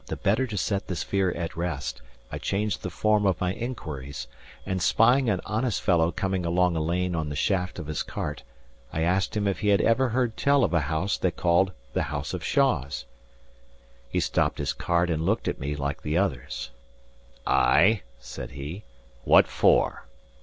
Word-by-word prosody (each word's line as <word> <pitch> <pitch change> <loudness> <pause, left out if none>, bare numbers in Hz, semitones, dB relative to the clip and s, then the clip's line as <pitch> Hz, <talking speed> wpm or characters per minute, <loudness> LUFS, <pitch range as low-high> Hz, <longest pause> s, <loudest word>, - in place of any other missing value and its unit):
The - - -3
better 110 +7 +1
to 105 -4 -5
set 100 +2 -1
this 90 -6 -2
fear 95 -2 +1
at 85 -1 -4
rest, 80 -7 -3 0.3
I - - -4
changed 105 +1 -1
the 90 - -4
form 105 +3 +2
of 95 -3 +1
my 90 0 0
inquiries; 70 - -5 0.4
and 95 -1 -2
spying 120 +7 +4
an 95 -4 0
honest 110 -1 -1
fellow 85 -2 +2
coming 95 -1 -1
along 90 +1 +2
a 80 - 0
lane 90 +3 0
on 80 -2 -2
the 75 - -4
shaft 90 +2 0
of - - -5
his 75 -1 -3
cart, - - -4 0.5
I 80 - -2
asked 95 +5 +1
him 105 -1 0
if 100 - -1
he 105 - -1
had 100 -1 +5
ever 125 +3 +3
heard 120 -1 0
tell 140 -1 +3
of 90 - +1
a 85 - +4
house 80 +7 -1
they 90 - +2
called 85 +2 +2 0.2
the - - +1
house 70 -1 -4
of - - -4
Shaws. 70 +2 +1 1.0
He - - 0
stopped - - +1
his - - -1
cart 85 0 0
and 80 0 -1
looked 105 +7 0
at - - -2
me, 70 +2 -3
like 70 0 -3
the 75 +2 -1
others. 70 -9 -2 0.7
"Ay" 105 - +4 0.2
said - - -8
he. 75 +9 -7 0.4
"What - - +6
for?" - - +2
90 Hz, 190 wpm, -26 LUFS, 80-105 Hz, 1.0 s, What